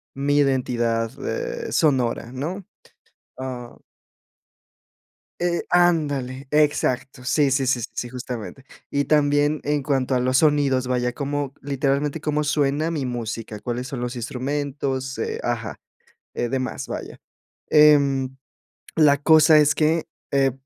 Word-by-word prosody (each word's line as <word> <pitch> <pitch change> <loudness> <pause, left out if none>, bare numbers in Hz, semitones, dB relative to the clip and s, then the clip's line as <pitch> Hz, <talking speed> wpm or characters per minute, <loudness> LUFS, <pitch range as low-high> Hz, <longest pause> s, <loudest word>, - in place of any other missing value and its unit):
mi 140 +1 +1
identidad, 120 -5 +1 0.2
eh, 475 -1 -4
sonora, 125 -6 +1
¿no?, 160 +10 -4 0.8
ah 125 -2 -7 1.6
eh 175 0 0
Ándale, 145 -7 +1
exacto, 140 -3 +1
sí, 135 +2 +2
sí, 135 0 +1
sí, 125 -1 +2
sí, 120 - -4
justamente, 125 +1 -7 0.2
y 140 0 0
también, 145 0 +2
en 145 -1 0
cuanto 135 -2 0
a - - +2
los 130 +1 +2
sonidos, 140 -4 +2
vaya 125 -1 0
como, 140 0 -3
literalmente, 140 +2 -1
cómo 150 -1 0
suena 150 +1 +1
mi 155 -5 -2
música, 115 -3 -5
cuáles 125 +3 -4
son 130 -1 -5
los 125 +1 -3
instrumentos, 130 +1 -3
eh, - - -3
ajá, 115 -4 -3 0.6
eh, 120 - -1
demás, 130 +1 -3
vaya, - - -7 0.5
em, 140 -3 +4 0.6
la 150 -3 +5
cosa 155 0 +6
es 150 0 +4
que, 160 +1 +1 0.3
eh, 135 -1 +2
135 Hz, 125 wpm, -23 LUFS, 125-150 Hz, 1.6 s, cosa